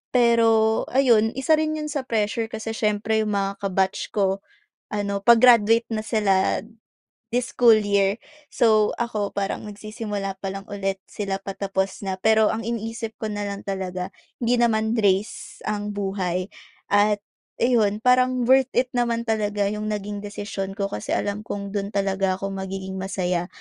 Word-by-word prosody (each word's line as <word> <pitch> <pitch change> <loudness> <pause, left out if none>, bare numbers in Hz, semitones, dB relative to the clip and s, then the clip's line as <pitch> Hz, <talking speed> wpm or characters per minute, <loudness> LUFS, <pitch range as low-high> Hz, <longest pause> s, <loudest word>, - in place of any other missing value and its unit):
Pero 225 -2 +4
ayun, 235 -4 +3
isa 290 +4 +3
rin 310 0 0
'yon 300 -1 -4
sa 280 -3 -3
pressure 220 0 0
kasi 220 0 -5
siyempre 220 0 0
'yong 210 -1 0
mga 195 0 0 0.2
ka-batch 190 0 -1
ko 195 -1 +1 0.5
ano, 200 -1 -2
pa-graduate 230 -1 +6
na 215 -2 -3
sila 205 -4 +2 0.7
this 245 +1 -1
school 230 -3 +6
year, 200 0 +1 0.3
so, 215 -2 +3
ako 220 -4 -2
parang 200 -1 -3
nagsisimula 210 -1 -5
pa 195 - -2
lang 195 +1 -7
ulit 195 -1 -3
sila 195 -2 -3
patapos 195 0 -3
na. 190 -1 -3
Pero 220 +1 +4
ang 225 0 -3
iniisip 225 -1 -4
ko 215 - -2
na 205 0 -3
lang 200 0 -5
talaga, 185 -1 -4 0.3
hindi 240 +1 +2
naman 225 -1 +2
race 200 0 0
ang 210 0 -3
buhay 190 -2 -2 0.4
at 205 0 +3 0.4
ayun, 220 -4 +2
parang 255 0 +3
worth 265 0 +5
it 250 +1 +2
naman 235 -1 +1
talaga 210 -3 -1
'yong 210 0 -4
naging 210 -1 -3
desisyon 205 -1 -5
ko 200 -1 -2
kasi 105 - -3
alam 205 +1 -2
kong 200 0 -5
dun 200 0 -4
talaga 195 -1 +1
ako 195 +1 -4
magiging 190 0 -5
masaya. 180 -2 -1
210 Hz, 155 wpm, -24 LUFS, 195-225 Hz, 0.7 s, pa-graduate